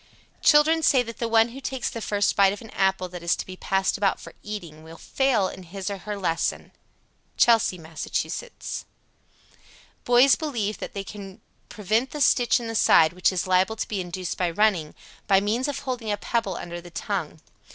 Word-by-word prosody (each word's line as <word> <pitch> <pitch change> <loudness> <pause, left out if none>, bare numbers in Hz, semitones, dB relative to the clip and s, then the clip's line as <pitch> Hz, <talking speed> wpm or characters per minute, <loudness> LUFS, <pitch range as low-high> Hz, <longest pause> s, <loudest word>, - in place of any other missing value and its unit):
Children 315 +2 +5
say 265 -4 +4
that 230 -1 -9
the 235 - -1
one 225 0 +4
who 265 +4 -10
takes 265 -2 -3
the 230 - -5
first 205 -1 0
bite 195 -1 +5
of 205 - -8
an 225 - -12
apple 190 -1 0
that 175 -1 -8
is 170 0 +1
to - - -6
be 185 - -9
passed 190 +1 0
about 200 -1 +1
for - - -11
eating 175 -7 -7
will 160 +1 -12
fail 250 -5 +1
in 190 - -8
his 190 +3 -6
or 200 - -5
her 210 +2 -5
lesson. 165 -4 -2 0.7
Chelsea, 225 -5 +4
Mass. 160 -1 -8
100. - - -3 1.5
Boys 245 +3 +6
believe 230 -9 -3
that - - -7
they 200 - -3
can 195 0 -10 0.3
prevent 220 +5 0
the 300 - -7
stitch 245 -3 +3
in 235 - -6
the 225 - -4
side 165 -6 +5
which 180 +2 +2
is 185 -2 -2
liable 185 +3 +2
to 220 - -4
be 200 -3 -2
induced 180 0 -5
by 180 -2 +1
running, 175 -4 +1 0.3
by 195 -1 +5
means 220 +7 -1
of 290 - -3
holding 245 -5 -3
a 205 - 0
pebble 205 -3 -2
under 175 0 -6
the 175 - -12
tongue. 170 -3 -4
205 Hz, 200 wpm, -25 LUFS, 185-235 Hz, 1.5 s, Boys